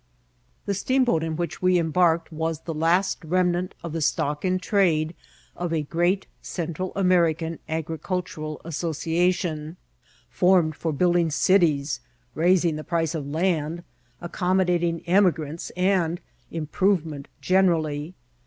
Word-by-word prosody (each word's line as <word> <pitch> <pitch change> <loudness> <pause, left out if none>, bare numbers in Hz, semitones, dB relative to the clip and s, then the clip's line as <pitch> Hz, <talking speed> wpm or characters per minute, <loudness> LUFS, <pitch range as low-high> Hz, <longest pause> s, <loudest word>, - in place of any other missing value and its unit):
The 200 - 0
steamboat 245 -3 +2
in 160 -1 -2
which 170 -1 -4
we 185 0 +4
embarked 165 0 +2
was 160 0 -2
the 165 - -5
last 170 +5 +1
remnant 180 +2 0
of 165 -2 -5
the 165 - -2
stock 145 0 0
in 185 -1 +1
trade 175 -5 +1 0.4
of 175 -1 -3
a 160 -2 0
great 175 +5 0 0.2
Central 170 +1 -4
Amer 180 -4 +4
ican 160 +1 -5
agricultural 160 -1 -4
association, 165 0 -1 0.5
formed 180 -4 +3
for 165 0 -2
building 175 +2 +2
cities, 155 -4 +2 0.3
raising 170 -1 +2
the 155 - -6
price 165 -1 -1
of 150 -4 -4
land, 165 +1 -1 0.4
accommodating 175 -1 0
emigrants, 170 -4 +1
and 180 -2 +1 0.3
improvement 160 -2 -1
generally. 165 -4 +1
170 Hz, 120 wpm, -25 LUFS, 160-180 Hz, 0.5 s, we